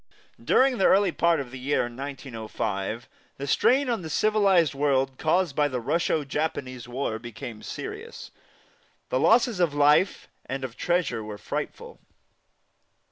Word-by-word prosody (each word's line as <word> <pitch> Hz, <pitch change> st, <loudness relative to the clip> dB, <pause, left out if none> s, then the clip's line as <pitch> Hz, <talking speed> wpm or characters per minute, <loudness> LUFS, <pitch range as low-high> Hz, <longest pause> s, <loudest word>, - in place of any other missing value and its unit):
During 260 Hz, -2 st, +3 dB
the 190 Hz, -, +5 dB
early 195 Hz, -1 st, +4 dB
part 170 Hz, -1 st, +2 dB
of 130 Hz, -3 st, -6 dB
the 130 Hz, -, -8 dB
year 135 Hz, +3 st, +1 dB
1905, 120 Hz, -4 st, -5 dB, 0.3 s
the 140 Hz, -, -5 dB
strain 260 Hz, -, +3 dB
on 235 Hz, -5 st, -1 dB
the 160 Hz, -, -7 dB
civilized 195 Hz, -4 st, +3 dB
world 135 Hz, -2 st, 0 dB
caused 160 Hz, -1 st, +1 dB
by 150 Hz, -1 st, +3 dB
the 130 Hz, -3 st, -3 dB
Russo 155 Hz, +4 st, 0 dB
Japanese 135 Hz, -4 st, -3 dB
War 120 Hz, -3 st, -3 dB
became 115 Hz, -1 st, -8 dB
serious. -, -, -7 dB, 0.8 s
The 130 Hz, -, +1 dB
losses 230 Hz, -, +3 dB
of 165 Hz, -5 st, +1 dB
life 150 Hz, +6 st, +3 dB, 0.2 s
and 135 Hz, 0 st, -4 dB
of 125 Hz, -3 st, -5 dB
treasure 175 Hz, -10 st, 0 dB
were 105 Hz, -1 st, -7 dB
frightful. -, -, -6 dB
140 Hz, 140 wpm, -26 LUFS, 125-175 Hz, 0.8 s, the